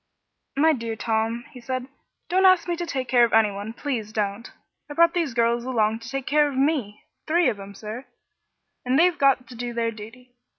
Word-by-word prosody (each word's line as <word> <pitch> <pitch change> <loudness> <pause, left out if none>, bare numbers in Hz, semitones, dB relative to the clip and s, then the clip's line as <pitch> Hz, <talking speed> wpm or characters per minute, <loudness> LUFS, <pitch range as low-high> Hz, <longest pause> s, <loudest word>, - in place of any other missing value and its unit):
"My 315 +2 +5
dear 230 -4 -4
Tom," 225 +2 -1
he 250 - -12
said, 255 +1 -3 0.4
"don't 375 +2 +2
ask 370 -2 +5
me 345 - 0
to 345 0 -5
take 260 -4 -3
care 245 0 +4
of 235 - +2
anyone 210 -1 +2
please 230 -4 -4
don't! 210 +1 -3 0.4
I 290 - -7
brought 335 +1 +5
these 330 -9 -1
girls 235 0 +2
along 225 -3 0
to 230 0 -10
take 270 -1 -4
care 295 +1 +3
of 275 -2 -5
me 265 -7 0 0.2
three 345 +2 +3
of 205 - -4
'em, 200 0 -10
sir 220 +6 -8 0.8
and 255 +1 +1
they've 350 +2 +3
got 270 -2 +3
to - - -12
do 240 0 -5
their 230 -1 0
duty. 230 +4 -12
245 Hz, 205 wpm, -24 LUFS, 225-285 Hz, 0.8 s, My